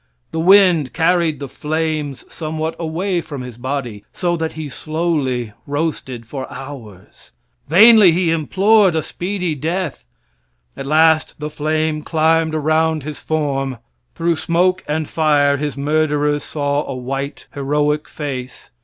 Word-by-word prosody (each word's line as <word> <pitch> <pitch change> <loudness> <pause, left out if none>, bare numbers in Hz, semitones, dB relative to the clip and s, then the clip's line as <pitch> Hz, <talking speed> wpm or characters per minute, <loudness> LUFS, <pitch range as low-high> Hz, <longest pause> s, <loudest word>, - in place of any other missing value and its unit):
The 160 - -3
wind 180 -5 +5
carried 165 -3 +2
the 140 - -5
flames 155 -1 -3
somewhat 160 0 -4
away 175 +3 -1
from 145 -5 -7
his 125 -2 -8
body, 125 -5 -4
so 175 -1 -1
that 160 -1 -3
he 155 -1 -5
slowly 145 -7 -2
roasted 140 -5 -3
for 130 +3 -6
hours. 125 -8 -11 0.4
Vainly 210 +2 +8
he 170 0 +1
implored 190 +4 +3
a 160 - 0
speedy 180 0 -3
death. 160 - -3 0.7
At 135 0 -6
last 155 +1 +3
the 150 0 -4
flame 155 +1 -1
climbed 160 0 +1
around 155 0 +1
his 150 0 -6
form; 135 -4 -2 0.4
through 170 -1 0
smoke 180 +3 +1
and 155 0 -1
fire 145 -3 +2
his 145 0 -3
murderers 150 0 +1
saw 145 -1 -1
a 135 - -4
white, 135 +3 -5
heroic 150 +2 0
face. 130 -4 -6
155 Hz, 135 wpm, -19 LUFS, 140-165 Hz, 0.7 s, Vainly